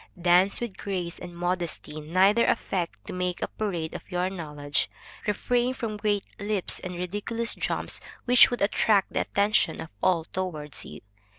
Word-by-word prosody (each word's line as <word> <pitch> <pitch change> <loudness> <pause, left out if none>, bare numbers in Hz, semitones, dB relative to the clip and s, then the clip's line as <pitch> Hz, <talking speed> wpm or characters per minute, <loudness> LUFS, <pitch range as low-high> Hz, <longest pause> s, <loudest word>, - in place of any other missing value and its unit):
Dance 180 +3 +4
with 235 -5 -4
grace 180 -4 -3
and 175 -1 -9
modesty; 175 -3 -2
neither 190 +8 +4
affect 175 -3 -1
to - - -6
make 180 -1 -1
a - - 0
parade 175 -7 -3
of - - -5
your 180 0 0
knowledge; 150 -5 -1 0.4
refrain 245 +4 +1
from 225 -5 -3
great 205 -1 +1 0.2
leaps 205 -2 -1
and 180 -1 -6
ridiculous 205 +6 -1
jumps - - -1 0.2
which 250 0 +8
would 245 -4 -1
attract 200 -1 +3
the - - +2
attention 205 +2 +2
of 160 - -6
all 175 -3 +3
towards 160 -5 -4
you. - - -9
185 Hz, 160 wpm, -27 LUFS, 175-210 Hz, 0.4 s, which